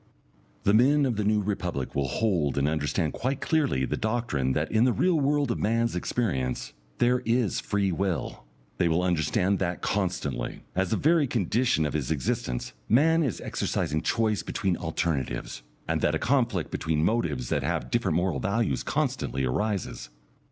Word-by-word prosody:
The 100 - +3
men 140 +6 +5
of 125 -4 0
the 105 - -1
New 105 +1 +2
Republic 90 -9 -3
will 70 -1 0
hold 80 - 0
and 70 +1 +2
understand 75 +1 0
quite 130 +2 -2
clearly 145 - +1
the - - -2
doctrine 110 - -1
that 75 +3 -1
in 110 +1 +4
the 125 - +4
real 175 +4 +2
world 145 -2 +1
of - - -2
man's 115 0 +1
experience, 70 - -2 0.2
there 125 +1 +3
is 115 -3 +1
Free 100 -2 0
Will. 90 -2 -2 0.4
They 85 - +3
will 85 +2 +1
understand 90 +3 +1
that 90 -2 -2
constantly, 90 -8 -2
as 95 -1 0
a 110 - +2
very 155 +2 +3
condition 115 -5 +1
of 75 - -2
his 75 -4 -2
existence, 65 -4 -2 0.2
man 160 +8 +4
is 135 -9 -1
exercising 75 +1 -1
choice 110 -3 +1
between 95 -3 -1
alternatives, 80 -7 -2 0.3
and - - 0
that 75 - +2
a - - +2
conflict 115 - 0
between 80 -1 0
motives 80 - 0
that - - +1
have - - -2
different 95 -9 +1
moral 90 -5 0
values 100 - 0
constantly 65 +2 -1
arises. 100 - -2
95 Hz, 165 wpm, -27 LUFS, 75-115 Hz, 0.4 s, men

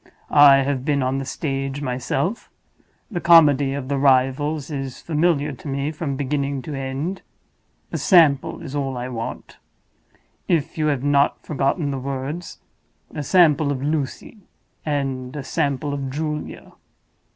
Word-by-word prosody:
I 140 -1 +8
have 135 -2 -2
been 140 -1 +1
on 130 +1 0
the 135 - -4
stage 135 -1 -3
myself; 145 - -2 0.6
the 175 -4 -3
comedy 145 -5 +5
of 135 -2 -5
the 140 0 -1
Rivals 140 +3 +2
is 135 -2 -5
familiar 155 -2 +1
to 140 - -10
me 140 +2 -2
from 150 -3 -4
beginning 140 -1 -2
to 155 - -6
end. 135 +7 -4 0.7
A - - -3
sample 155 -8 +4
is 140 -4 -7
all 135 -3 -2
I 125 +1 -4
want, 115 -2 -6 0.9
if 165 -5 0
you 155 -1 0
have 140 -3 0
not 145 0 +2
forgotten 145 +1 0
the 135 - -3
words—a 140 +3 -7
sample 155 -2 +4
of 135 -1 -3
'Lucy,' 150 - -3 0.4
and 135 -3 -3
a 145 - -4
sample 140 +1 -1
of 140 -2 -3
'Julia. 150 +2 -5
140 Hz, 140 wpm, -22 LUFS, 135-150 Hz, 0.9 s, I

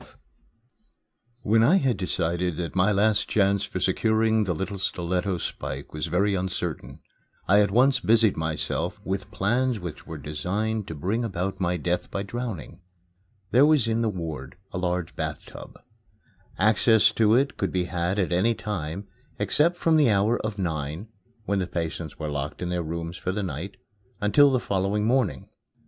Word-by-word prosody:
XII - - -16 1.4
When 110 +2 +4
I 135 +11 +5
had 135 - +2
decided 85 -2 0
that 85 +1 -4
my 100 +3 +3
chance 100 -1 +1
for - - -5
securing 110 0 +2
the 90 -3 -1
little 95 +3 -4
stiletto 90 0 -1
spike 70 -3 -5
was 75 +2 -3
very 100 +5 +1
uncertain, 95 -1 -3 0.5
I 100 +3 +5
at 100 - +2
once 130 +6 +4
busied 110 -2 +4
myself 80 -1 -2
with 95 0 -3
plans 120 +4 0
which 85 -4 -8
were - - -6
designed 100 +8 -2
to 80 - -6
bring 100 +11 -1
about 95 -3 -3
my 90 -1 0
death 85 +3 -2
by 100 - -3
drowning. 100 - -6 0.7
There 125 +3 +6
was 150 -6 +4
in 115 0 +1
the 115 - +1
ward 80 -7 -6
a 90 - -3
large 90 -2 -2
bath 80 -1 -4
tub. - - -11 0.8
Access 110 +1 +4
to 110 0 +3
it 135 +3 +2
could 95 - -1
be 90 -1 0
had 90 +2 -2
at 95 -4 0
any 105 +7 +2
time, 100 -2 -4 0.3
except 170 +4 +2
from 165 -2 +3
the 145 -5 +5
hour 105 +3 +2
of 110 -1 -4
nine 80 +2 -3 0.4
(when 100 -1 0
the 90 - -1
patients 80 -3 -4
were 75 -2 -4
locked 70 +4 -4
in 90 - -2
their 90 0 -1
rooms 85 +1 -5
for 90 - -2
the 105 +2 -2
night) 90 +3 -5 0.4
until 140 +8 +5
the 130 -2 +2
following 100 0 0
morning. 125 -2 +1
95 Hz, 170 wpm, -25 LUFS, 85-110 Hz, 1.4 s, There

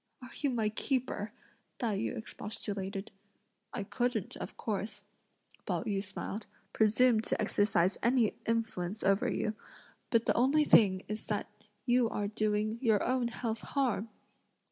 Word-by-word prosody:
"Are 250 -2 -11
you 285 - 0
my 225 -4 +1
keeper?" 225 -3 -1 0.5
Tai 225 -4 0
yü 225 - -2
expostulated. 200 -2 -3 0.6
"I - - -3
couldn't, 240 -1 -1
of - - -7
course," 210 0 -3 0.6
Pao - - 0
yü 200 -2 -1
smiled, 205 +1 -5 0.3
"presume 225 +2 +4
to 220 - 0
exercise 195 -3 +2
any 235 -2 +3
influence 220 -4 -1
over 195 +1 +3
you; 215 - -1 0.6
but 230 -1 +3
the - - +3
only 275 +6 +4
thing 190 -7 +5
is 215 +1 -4
that 210 -1 -2 0.3
you 245 -2 +3
are 205 -2 -2
doing 215 +1 0
your 220 -5 +3
own 250 -1 +1
health 230 -1 -3
harm!" 245 -6 0
220 Hz, 140 wpm, -32 LUFS, 205-240 Hz, 0.6 s, thing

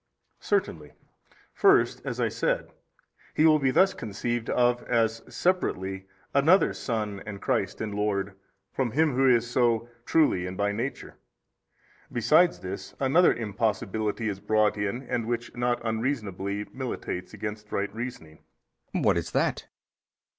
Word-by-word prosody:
A. - - -38
Certainly. 410 - -1 0.6
For 395 -1 +6
first - - -2
(as - - -4
I - - +2
said) - - -1 0.6
He 155 - +4
will 155 -1 +6
be 135 -2 +2
thus 190 +8 +4
conceived 115 +2 -3
of 120 0 +2
as 115 -1 +1
separately 95 - -1 0.3
another 160 +8 +4
son 105 -4 -3
and 100 -1 -6
christ 115 -8 -1
and 110 -2 -3
lord 100 -1 -1 0.4
from 130 -3 0
Him 155 0 +3
Who 135 +1 +4
is 120 -1 +3
so 120 -1 +1 0.2
truly 120 - +3
and 90 0 -6
by 100 0 +1
Nature: 115 +7 -5 0.9
besides 155 +10 +3
this, 95 +1 -7
another 140 +7 +5
impossibility 110 0 -1
is 100 -2 -3
brought 105 +1 +2
in 105 +5 -2
and 120 -3 -2
which 120 0 -3
not 120 0 0
unreasonably 105 -4 -2
militates 120 -7 -5
against 105 0 -6
right 100 0 -2
reasoning. 115 -10 -7 0.5
B. - - 0
What - - +3
is - - -6
that? - - 0
115 Hz, 145 wpm, -27 LUFS, 105-130 Hz, 0.9 s, For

